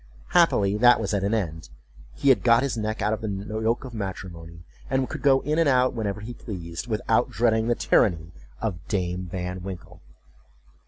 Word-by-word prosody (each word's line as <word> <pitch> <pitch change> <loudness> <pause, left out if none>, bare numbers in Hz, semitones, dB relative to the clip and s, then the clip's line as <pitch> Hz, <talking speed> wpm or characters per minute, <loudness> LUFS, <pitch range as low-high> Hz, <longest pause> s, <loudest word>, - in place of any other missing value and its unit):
Happily 105 - +3
that 120 +2 +6
was 110 -1 -2
at 100 -1 0
an 100 +3 +1
end; 80 -7 -4 0.5
he 140 - +1
had 130 - +5
got 115 +1 +4
his 140 - -1
neck 110 0 -3
out 105 - +1
of 110 - -4
the 110 - -3
yoke 110 +5 -2
of 125 - -9
matrimony, 85 -5 -7 0.3
and 130 -1 +1
could - - -6
go 135 -2 +4
in 150 +3 0
and 165 -3 +4
out 130 -1 +3
whenever 105 -3 -3
he 115 +3 -7
pleased, 85 -8 -7
without - - +1
dreading 110 -1 +1
the 120 - +2
tyranny 85 -7 +2 0.3
of 95 -6 -3
Dame 90 -2 -2
Van 90 +1 -5
Winkle. 90 -2 -9
105 Hz, 190 wpm, -25 LUFS, 90-120 Hz, 0.5 s, that